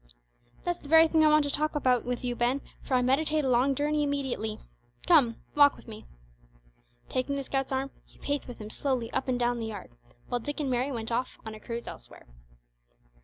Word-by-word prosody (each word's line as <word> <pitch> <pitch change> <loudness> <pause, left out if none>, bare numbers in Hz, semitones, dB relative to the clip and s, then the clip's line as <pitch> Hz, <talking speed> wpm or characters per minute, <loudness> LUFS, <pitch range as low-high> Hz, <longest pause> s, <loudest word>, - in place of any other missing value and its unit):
"That's 350 0 -2
the - - -13
very 320 +2 +7
thing 320 0 +3
I - - +6
want 305 -1 +4
to 285 - -1
talk 305 +2 -1
about 255 -4 +2
with 245 0 -3
you, 245 -1 -1
Ben, 245 +4 +1 0.2
for 260 - -1
I 250 - +3
meditate 300 +3 +2
a - - +1
long 255 +3 +3
journey 295 +2 +1
immediately. 265 -7 -2 0.5
Come, 270 -10 +5 0.2
walk 285 -1 +6
with - - -16
me." 215 -1 -10 1.0
Taking 260 +2 -1
the 275 - -2
scout's 270 0 -2
arm 265 +1 -1
he - - -24
paced 285 0 -3
with 245 - -8
him 215 0 -8
slowly 255 -5 -1
up - - -1
and 255 -1 +1
down 240 0 +1
the 225 - -3
yard, 210 -3 -8 0.4
while 245 - -1
Dick 290 +5 -5
and 280 -3 -1
Mary 250 +3 0
went 230 -2 -4
off 250 +2 -2
on 220 - -6
a 215 - -10
cruise 235 +1 -6
elsewhere. - - -10
265 Hz, 215 wpm, -28 LUFS, 240-290 Hz, 1.0 s, very